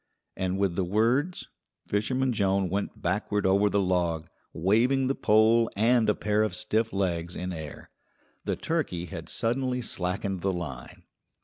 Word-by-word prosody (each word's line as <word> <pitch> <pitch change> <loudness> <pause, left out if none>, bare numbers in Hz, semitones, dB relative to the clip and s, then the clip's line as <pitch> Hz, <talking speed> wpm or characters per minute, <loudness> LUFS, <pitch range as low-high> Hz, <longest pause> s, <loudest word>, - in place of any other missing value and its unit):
And 95 0 -1
with 95 -3 0
the 95 - +1
words 120 - +1 0.4
Fisherman 130 +5 0
Jones 95 -3 +1
went 100 +1 -3
backward 105 +3 0
over 100 +2 +4
the 100 - +1
log, 85 -4 0 0.2
waving 115 +10 +2
the 135 - +1
pole 115 0 +4
and 115 +2 +3
a 105 - +3
pair 105 0 +1
of 105 -4 0
stiff 110 +2 0
legs 85 -3 -1
in 90 0 -4
air. 80 -3 -8 0.5
The - - 0
turkey 135 - -2
had 85 -3 -8
suddenly 125 +1 -1
slackened 95 -1 -2
the 95 +1 0
line. 70 -8 -7
100 Hz, 150 wpm, -27 LUFS, 90-115 Hz, 0.5 s, over